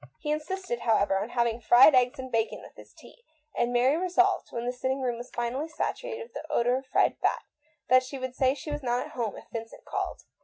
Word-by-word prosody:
He 300 Hz, -, -3 dB
insisted, 305 Hz, -3 st, -3 dB
however, 205 Hz, -4 st, +2 dB
on 205 Hz, +4 st, -4 dB
having 235 Hz, -1 st, 0 dB
fried 240 Hz, +6 st, +7 dB
eggs 255 Hz, +2 st, +3 dB
and 260 Hz, -1 st, -7 dB
bacon 225 Hz, -1 st, -1 dB
with -, -, -14 dB
his -, -, -14 dB
tea, 475 Hz, -, -17 dB, 0.3 s
and 240 Hz, -, +1 dB
Mary 250 Hz, +4 st, +3 dB
resolved, 365 Hz, +1 st, +2 dB
when 235 Hz, 0 st, -4 dB
the 245 Hz, -, -1 dB
sitting 260 Hz, +2 st, -2 dB
room 245 Hz, -3 st, -1 dB
was 245 Hz, +1 st, -8 dB
finally 245 Hz, +6 st, -3 dB
saturated 470 Hz, +8 st, -4 dB
with 465 Hz, -, -16 dB
the -, -, -8 dB
odour 245 Hz, +1 st, +2 dB
of 265 Hz, 0 st, -8 dB
fried -, -, +2 dB
fat, -, -, 0 dB, 0.4 s
that 255 Hz, +1 st, +6 dB
she 260 Hz, +2 st, -7 dB
would 260 Hz, -1 st, -5 dB
say 260 Hz, +1 st, +2 dB
she 295 Hz, +2 st, -7 dB
was 295 Hz, 0 st, -3 dB
"not 245 Hz, -1 st, -1 dB
at -, -, -11 dB
home" 230 Hz, -4 st, -3 dB
if -, -, -11 dB
Vincent 225 Hz, -1 st, -7 dB
called. -, -, -4 dB
255 Hz, 230 wpm, -28 LUFS, 240-295 Hz, 0.4 s, fried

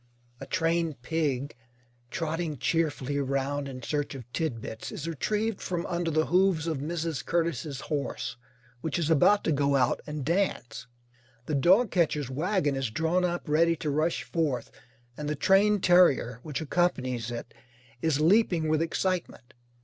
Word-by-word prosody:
A -, -, -8 dB
trained 165 Hz, -5 st, 0 dB
pig, 145 Hz, -4 st, -1 dB, 0.5 s
trotting 160 Hz, 0 st, -3 dB
cheerfully 145 Hz, -2 st, 0 dB
round 140 Hz, +1 st, -1 dB
in 130 Hz, -2 st, -8 dB
search 145 Hz, 0 st, -2 dB
of 125 Hz, -4 st, -8 dB
tidbits, 115 Hz, -8 st, -4 dB
is 150 Hz, -, -6 dB
retrieved 210 Hz, +7 st, -1 dB
from 175 Hz, -2 st, -3 dB
under 175 Hz, -1 st, -1 dB
the 155 Hz, 0 st, +2 dB
hooves 180 Hz, -3 st, +2 dB
of 160 Hz, -4 st, -2 dB
Mrs. 160 Hz, 0 st, -3 dB
Curtis's 165 Hz, -4 st, -1 dB
horse, 145 Hz, -4 st, -3 dB, 0.4 s
which 160 Hz, +7 st, -2 dB
is 165 Hz, -2 st, 0 dB
about 200 Hz, +7 st, +5 dB
to -, -, +1 dB
go 140 Hz, -1 st, +2 dB
out 125 Hz, -3 st, +2 dB
and 150 Hz, -3 st, -4 dB
dance. 175 Hz, -8 st, -1 dB, 0.6 s
The 155 Hz, -, -3 dB
dogcatcher's 170 Hz, -, +3 dB
wagon 155 Hz, 0 st, 0 dB
is 135 Hz, -3 st, -1 dB
drawn 160 Hz, +9 st, 0 dB
up 175 Hz, -1 st, -2 dB
ready 165 Hz, +3 st, +3 dB
to 150 Hz, -2 st, -3 dB
rush 155 Hz, -1 st, 0 dB
forth, 125 Hz, -1 st, -2 dB, 0.5 s
and 150 Hz, -1 st, -4 dB
the 150 Hz, -, -1 dB
trained 200 Hz, +5 st, +3 dB
terrier 160 Hz, -10 st, +4 dB
which 150 Hz, +1 st, -4 dB
accompanies 130 Hz, -8 st, 0 dB
it 120 Hz, 0 st, -6 dB, 0.5 s
is 160 Hz, -3 st, +1 dB
leaping 170 Hz, -2 st, +3 dB
with 155 Hz, 0 st, +2 dB
excitement. 165 Hz, -7 st, -2 dB
155 Hz, 150 wpm, -28 LUFS, 140-170 Hz, 0.6 s, about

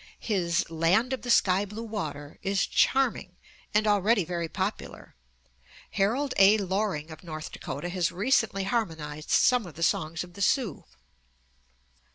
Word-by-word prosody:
His 175 Hz, -6 st, 0 dB
"Land 175 Hz, +10 st, +1 dB
of 260 Hz, -, -3 dB
the 245 Hz, -, -7 dB
Sky 195 Hz, -4 st, +4 dB
Blue 210 Hz, +3 st, -7 dB
Water" 155 Hz, -10 st, -6 dB
is 195 Hz, 0 st, +1 dB
charming, 255 Hz, -9 st, +1 dB, 0.4 s
and 210 Hz, +1 st, +2 dB
already 205 Hz, -1 st, +3 dB
very 170 Hz, -1 st, -3 dB
popular. 195 Hz, +4 st, -5 dB, 0.8 s
Harold 245 Hz, +8 st, 0 dB
A. 200 Hz, +2 st, +7 dB
Loring 190 Hz, -5 st, -2 dB
of 155 Hz, -, -11 dB
North 155 Hz, -2 st, -7 dB
Dakota 145 Hz, +6 st, -6 dB
has 175 Hz, -1 st, 0 dB
recently 205 Hz, 0 st, +1 dB
harmonized 160 Hz, -8 st, -3 dB
some 245 Hz, -6 st, +3 dB
of 160 Hz, -, -12 dB
the 165 Hz, -, -4 dB
songs 160 Hz, +1 st, 0 dB
of 175 Hz, -1 st, -13 dB
the 200 Hz, -, -9 dB
Sioux. 220 Hz, -, 0 dB
195 Hz, 145 wpm, -27 LUFS, 165-215 Hz, 0.8 s, A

